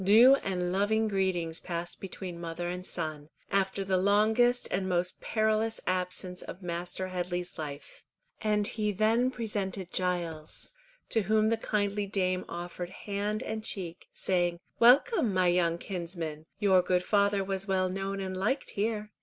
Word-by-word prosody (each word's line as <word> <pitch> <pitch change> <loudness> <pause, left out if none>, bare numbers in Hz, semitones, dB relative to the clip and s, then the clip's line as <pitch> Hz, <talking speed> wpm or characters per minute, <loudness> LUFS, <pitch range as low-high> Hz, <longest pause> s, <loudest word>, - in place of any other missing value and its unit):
Due 225 +7 +8
and 180 -5 -2
loving 215 +3 +2
greetings 185 -5 0
passed 170 0 -4
between 180 -2 -6
mother 170 +1 -4
and 180 +1 -4
son, 155 -3 -4 0.2
after 195 0 +1
the 190 -1 +1
longest 220 +6 +3
and 190 0 0
most 180 0 0
perilous 220 0 +1
absence 180 0 -2
of 190 - -9
Master 175 +2 -3
Headley's 180 -1 -3
life, 145 -2 -7 0.4
and 210 -1 +2
he 210 0 0
then 220 +5 +3
presented 205 -6 -3
Giles, 170 -4 -2 0.4
to 225 - +2
whom 215 +2 +3
the 230 - +3
kindly 205 -2 -1
dame 185 -2 0
offered 175 +1 -5
hand 205 +2 -3
and 220 0 -4
cheek, 180 -5 -4
saying, 175 -2 +1 0.2
"Welcome, 245 - +5
my 185 0 +3
young 170 -1 +2
kinsman, 170 -4 -5
your 190 -3 +5
good 180 0 +1
father 200 0 +2
was 195 0 -3
well 190 -1 +2
known 195 +1 -3
and 190 -1 -3
liked 220 +9 -1
here. 210 0 -2
190 Hz, 150 wpm, -30 LUFS, 175-210 Hz, 0.4 s, Due